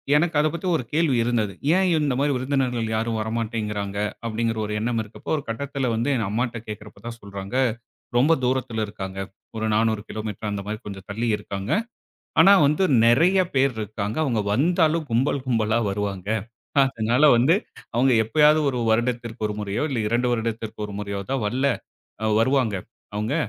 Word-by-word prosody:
எனக்கு 160 Hz, +1 st, +2 dB
அத 150 Hz, -, +3 dB
பத்தி 175 Hz, +2 st, -4 dB
ஒரு 150 Hz, -, -1 dB
கேள்வி 155 Hz, -4 st, +2 dB
இருந்தது. 115 Hz, -4 st, 0 dB, 0.2 s
ஏன் 190 Hz, 0 st, +3 dB
இந்த 150 Hz, -3 st, +1 dB
மாரி 145 Hz, +1 st, +2 dB
விருந்தினர்கள் 125 Hz, -3 st, 0 dB
யாரும் 110 Hz, 0 st, -1 dB
வரமாட்டேங்கிறாங்க? 110 Hz, -3 st, -3 dB, 0.3 s
அப்டிங்கிற 115 Hz, 0 st, -1 dB
ஒரு 105 Hz, -, -4 dB
எண்ணம் 115 Hz, +1 st, 0 dB
இருக்கப்போ, 105 Hz, -, -11 dB
ஒரு 145 Hz, -, -5 dB
கட்டத்தில 135 Hz, +2 st, -2 dB
வந்து, 115 Hz, +5 st, 0 dB
எங்க 115 Hz, -5 st, -1 dB
அம்மாட்ட 120 Hz, +1 st, -1 dB
கேக்கிறப்போ 105 Hz, 0 st, -9 dB
தான் 115 Hz, 0 st, -7 dB
சொல்றாங்க, 100 Hz, +2 st, -7 dB, 0.6 s
ரொம்ப 145 Hz, +7 st, +5 dB
தூரத்தில 125 Hz, -3 st, 0 dB
இருக்காங்க. 95 Hz, -2 st, -6 dB, 0.4 s
ஒரு 110 Hz, -, -1 dB
400 110 Hz, -1 st, +2 dB
கிலோமீட்டர், 110 Hz, 0 st, -4 dB
அந்த 100 Hz, -1 st, -3 dB
மாரி 105 Hz, +1 st, -3 dB
கொஞ்சம் 100 Hz, -2 st, -8 dB
தள்ளி 115 Hz, +4 st, -2 dB
இருக்காங்க. 100 Hz, 0 st, -5 dB, 0.7 s
ஆனா 200 Hz, -, +8 dB
வந்து, 150 Hz, +6 st, +1 dB, 0.2 s
நெறைய 165 Hz, +11 st, +5 dB, 0.2 s
பேர் 135 Hz, -2 st, +3 dB
இருக்காங்க. 105 Hz, 0 st, -4 dB
அவுங்க 115 Hz, -8 st, 0 dB
வந்தாலும், 160 Hz, -, +2 dB
கும்பல் 130 Hz, +3 st, +1 dB
கும்பலா 115 Hz, -2 st, +2 dB
வருவாங்க. 100 Hz, -1 st, -3 dB, 0.5 s
அதனால 120 Hz, 0 st, +1 dB
வந்து, 135 Hz, +9 st, +4 dB, 0.4 s
அவுங்க 130 Hz, +3 st, +4 dB
எப்பயாவது 150 Hz, +7 st, +4 dB
1 130 Hz, -, -3 dB
வருடத்திற்கு 120 Hz, 0 st, 0 dB
1 105 Hz, -, -4 dB
முறையோ, 105 Hz, -1 st, -2 dB
இல்ல 130 Hz, -4 st, -1 dB
2 120 Hz, +3 st, +1 dB
வருடத்திற்கு 115 Hz, -2 st, -3 dB
1 105 Hz, -, -8 dB
முறையோ 100 Hz, -1 st, -4 dB
தான் 135 Hz, -2 st, 0 dB
வல்ல, 130 Hz, +6 st, 0 dB, 0.6 s
அ -, -, -1 dB, 0.2 s
வருவாங்க 125 Hz, -3 st, +2 dB, 0.4 s
அவுங்க. 105 Hz, +6 st, -1 dB
115 Hz, 160 wpm, -24 LUFS, 105-135 Hz, 0.7 s, ஆனா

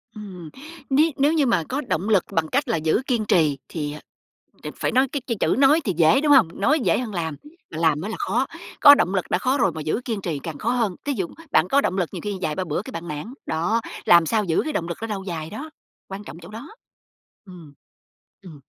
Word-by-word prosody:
Ừm. 185 Hz, -6 st, -9 dB, 0.4 s
Ní 305 Hz, +4 st, +3 dB
nếu 290 Hz, +3 st, +3 dB
như 300 Hz, -4 st, +2 dB
mà 195 Hz, -9 st, +2 dB
có 280 Hz, +3 st, -1 dB
động 205 Hz, -, -2 dB
lực 200 Hz, -5 st, +4 dB
bằng 160 Hz, -1 st, 0 dB
cách 280 Hz, -, 0 dB
là 230 Hz, -, 0 dB
giữ 160 Hz, +7 st, +1 dB
kiên 235 Hz, -5 st, 0 dB
trì 155 Hz, -8 st, +2 dB
thì, 150 Hz, -3 st, -4 dB
ờ, 150 Hz, -, -8 dB, 0.6 s
đ -, -, -6 dB
phải -, -, -1 dB
nói 260 Hz, +2 st, +3 dB
cái 285 Hz, -, -3 dB
cái 230 Hz, -4 st, -2 dB
chữ -, -, +2 dB
nói 295 Hz, +4 st, +5 dB
thì 195 Hz, -, -1 dB
dễ, 165 Hz, -, +5 dB
đúng 295 Hz, -1 st, +2 dB
hông? 260 Hz, -, +7 dB
Nói 305 Hz, +9 st, +3 dB
dễ 250 Hz, -, +2 dB
hơn 230 Hz, -4 st, -5 dB
làm, 160 Hz, -4 st, -3 dB, 0.4 s
mà 155 Hz, -, -7 dB
làm 160 Hz, -2 st, +2 dB
mới 200 Hz, -, -4 dB
là -, -, -4 dB
khó, 250 Hz, +3 st, 0 dB, 0.3 s
có 285 Hz, 0 st, +10 dB
động 185 Hz, -7 st, 0 dB
lực 190 Hz, -2 st, 0 dB
đã -, -, +2 dB
khó 265 Hz, +2 st, 0 dB
rồi 195 Hz, -8 st, +2 dB
mà 155 Hz, 0 st, -6 dB
giữ 155 Hz, +10 st, -1 dB
kiên 220 Hz, -5 st, -3 dB
trì 160 Hz, -6 st, -3 dB
càng 150 Hz, +1 st, -7 dB
khó 225 Hz, -, -2 dB
hơn, 225 Hz, -7 st, 0 dB
thí 285 Hz, -, 0 dB
dụ 190 Hz, -8 st, -2 dB, 0.2 s
bạn 170 Hz, -, +4 dB
có 280 Hz, +7 st, +3 dB
động 190 Hz, -, -1 dB
lực 175 Hz, -3 st, 0 dB
nhiều -, -, -6 dB
khi 205 Hz, -2 st, -3 dB
vài 155 Hz, -4 st, -1 dB
ba 185 Hz, -, -2 dB
bữa 160 Hz, +1 st, -2 dB
cái 260 Hz, -, -10 dB
bạn 170 Hz, -5 st, -7 dB
nản. 150 Hz, -, -6 dB
Đó, 175 Hz, +9 st, 0 dB, 0.2 s
làm 170 Hz, -1 st, +6 dB
sao 215 Hz, +5 st, +1 dB
giữ 165 Hz, -3 st, +1 dB
cái 310 Hz, -, -4 dB
động 170 Hz, -, -2 dB
lực 170 Hz, -, -5 dB
đó 225 Hz, -, -3 dB
lâu 200 Hz, -3 st, -4 dB
dài 160 Hz, -4 st, -5 dB
đó, 285 Hz, +10 st, -7 dB, 0.4 s
quan 195 Hz, +2 st, -7 dB
trọng 160 Hz, -4 st, -10 dB
chỗ 170 Hz, +2 st, -12 dB
đó. 225 Hz, +7 st, -9 dB, 0.8 s
Ừm. 170 Hz, -6 st, -13 dB, 0.7 s
Ừm. 160 Hz, -7 st, -13 dB
195 Hz, 255 wpm, -23 LUFS, 165-250 Hz, 0.8 s, có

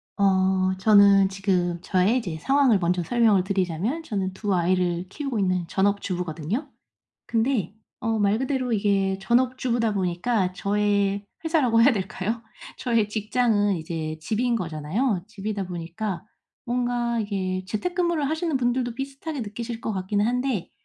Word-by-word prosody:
어 190 Hz, -1 st, +2 dB
저는 200 Hz, -1 st, +6 dB
지금 185 Hz, -3 st, 0 dB
저의 190 Hz, +7 st, +2 dB
이제 175 Hz, -9 st, -5 dB
상황을 270 Hz, -, +3 dB
먼저 175 Hz, 0 st, 0 dB
설명을 215 Hz, -1 st, +3 dB
드리자면 190 Hz, -, -1 dB
저는 195 Hz, -9 st, -2 dB
2 205 Hz, +1 st, -2 dB
아이를 180 Hz, 0 st, +1 dB
키우고 275 Hz, -1 st, -4 dB
있는 185 Hz, -3 st, 0 dB
전업주부거든요. 190 Hz, -, -1 dB, 0.6 s
근데 225 Hz, -, 0 dB, 0.3 s
어 225 Hz, -3 st, 0 dB
말 205 Hz, +1 st, +2 dB
그대로 260 Hz, -1 st, -1 dB
이게 195 Hz, -2 st, +1 dB
전업주부다 240 Hz, +1 st, +1 dB
보니까 185 Hz, +1 st, 0 dB
저의 200 Hz, 0 st, +1 dB, 0.2 s
회사라고 265 Hz, -9 st, +3 dB
해야 275 Hz, +4 st, +6 dB
될까요? 210 Hz, +2 st, -3 dB, 0.4 s
저의 230 Hz, -4 st, +1 dB
직장은 210 Hz, -1 st, +1 dB
이제 160 Hz, -1 st, -4 dB
집인 235 Hz, +7 st, 0 dB
거잖아요. 180 Hz, -, -1 dB
집이다 210 Hz, -2 st, -4 dB
보니까 175 Hz, +2 st, -5 dB, 0.4 s
뭔가 240 Hz, -1 st, 0 dB
이게 190 Hz, -3 st, -2 dB
재택근무를 340 Hz, -, -1 dB
하시는 320 Hz, -1 st, 0 dB
분들도 245 Hz, -1 st, 0 dB
비슷하게 275 Hz, +3 st, -5 dB
느끼실 230 Hz, +2 st, -5 dB
것 220 Hz, -, -3 dB
같기는 200 Hz, +2 st, 0 dB
한데 250 Hz, -5 st, -1 dB
205 Hz, 325 characters per minute, -25 LUFS, 185-240 Hz, 0.6 s, 저는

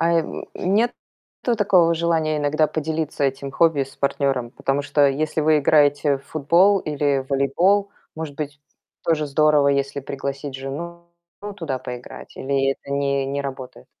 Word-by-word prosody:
Ай 170 Hz, 0 st, +3 dB
м, -, -, -6 dB
нет 215 Hz, +6 st, +1 dB, 0.5 s
такого 190 Hz, -8 st, +3 dB
желания 160 Hz, -2 st, 0 dB
иногда 150 Hz, +1 st, +2 dB
поделиться 155 Hz, -1 st, -3 dB
этим 135 Hz, 0 st, -2 dB
хобби 160 Hz, 0 st, +3 dB
с 135 Hz, -, -9 dB
партнёром? 135 Hz, -3 st, 0 dB
Потому 135 Hz, +2 st, -1 dB
что 145 Hz, 0 st, +3 dB
если 155 Hz, +3 st, -1 dB
вы 155 Hz, 0 st, +4 dB
играете 145 Hz, -1 st, +3 dB
в -, -, -21 dB
футбол 170 Hz, +7 st, +3 dB
или 145 Hz, -3 st, 0 dB
волейбол, 175 Hz, +9 st, +2 dB, 0.3 s
может 160 Hz, -3 st, -5 dB
быть, 150 Hz, 0 st, -6 dB, 0.4 s
тоже 155 Hz, -2 st, +1 dB
здорово, 150 Hz, 0 st, +3 dB
если 140 Hz, 0 st, 0 dB
пригласить 140 Hz, +1 st, -5 dB
жену, 160 Hz, +6 st, -6 dB, 0.4 s
ну, 205 Hz, 0 st, -5 dB
туда 165 Hz, -9 st, -4 dB
поиграть. 125 Hz, -1 st, -9 dB
Или 135 Hz, 0 st, 0 dB
это 140 Hz, -, -14 dB
не 140 Hz, -1 st, 0 dB
не 140 Hz, +1 st, -2 dB
работает? 130 Hz, -2 st, -8 dB
145 Hz, 150 wpm, -22 LUFS, 140-160 Hz, 0.5 s, вы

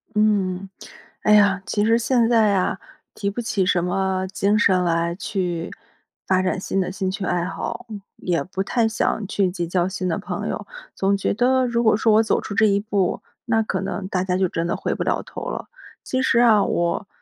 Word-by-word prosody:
嗯， 195 Hz, -3 st, +1 dB, 0.5 s
哎 210 Hz, -, +4 dB
呀， 200 Hz, -2 st, +5 dB
其 205 Hz, -, 0 dB
实 225 Hz, +1 st, +4 dB
现 235 Hz, 0 st, +2 dB
在 225 Hz, -3 st, +4 dB
呀， 195 Hz, -1 st, 0 dB, 0.4 s
提 200 Hz, -, -2 dB
不 240 Hz, -, -4 dB
起 215 Hz, -5 st, 0 dB
什 175 Hz, -1 st, +2 dB
么 190 Hz, +1 st, -1 dB
精 200 Hz, +2 st, +1 dB
神 185 Hz, -4 st, +3 dB
来， 170 Hz, 0 st, 0 dB
去， 180 Hz, -4 st, -3 dB, 0.6 s
发 185 Hz, -1 st, +3 dB
展 185 Hz, 0 st, 0 dB
新 195 Hz, -, -1 dB
的 185 Hz, -1 st, -1 dB
兴 190 Hz, -1 st, -2 dB
趣 195 Hz, 0 st, -4 dB
爱 175 Hz, -1 st, 0 dB
好， 195 Hz, +5 st, -5 dB, 0.3 s
也 170 Hz, -6 st, -1 dB
不 185 Hz, +3 st, -4 dB
太 225 Hz, +3 st, +1 dB
想 220 Hz, -1 st, -1 dB
去 195 Hz, -2 st, +1 dB
结 175 Hz, -1 st, -3 dB
交 175 Hz, +1 st, 0 dB
新 185 Hz, -1 st, -3 dB
的 165 Hz, -, -1 dB
朋 -, -, -4 dB
友。 -, -, -5 dB, 0.3 s
总 195 Hz, +1 st, +1 dB
觉 195 Hz, -, 0 dB
得 255 Hz, +3 st, +2 dB
如 235 Hz, -1 st, 0 dB
果 220 Hz, -2 st, +4 dB
说 220 Hz, -1 st, +3 dB
我 220 Hz, -, +6 dB
走 -, -, +1 dB
出 -, -, -6 dB
这 220 Hz, +2 st, +4 dB
一 200 Hz, 0 st, +2 dB
步， 200 Hz, -3 st, -1 dB, 0.2 s
那 225 Hz, -2 st, +2 dB
可 190 Hz, -3 st, -2 dB
能 190 Hz, 0 st, -4 dB
大 185 Hz, -1 st, -1 dB
家 185 Hz, -1 st, 0 dB
就 190 Hz, -, +2 dB
真 165 Hz, 0 st, -2 dB
的 175 Hz, -, -1 dB
回 -, -, -2 dB
不 -, -, -6 dB
了 -, -, -1 dB
头 -, -, -8 dB
了。 -, -, -5 dB, 0.4 s
其 260 Hz, 0 st, -1 dB
实 235 Hz, -2 st, +3 dB
啊， 220 Hz, -4 st, +5 dB
我， 170 Hz, +3 st, -1 dB
195 Hz, 225 characters per minute, -22 LUFS, 185-220 Hz, 0.6 s, 我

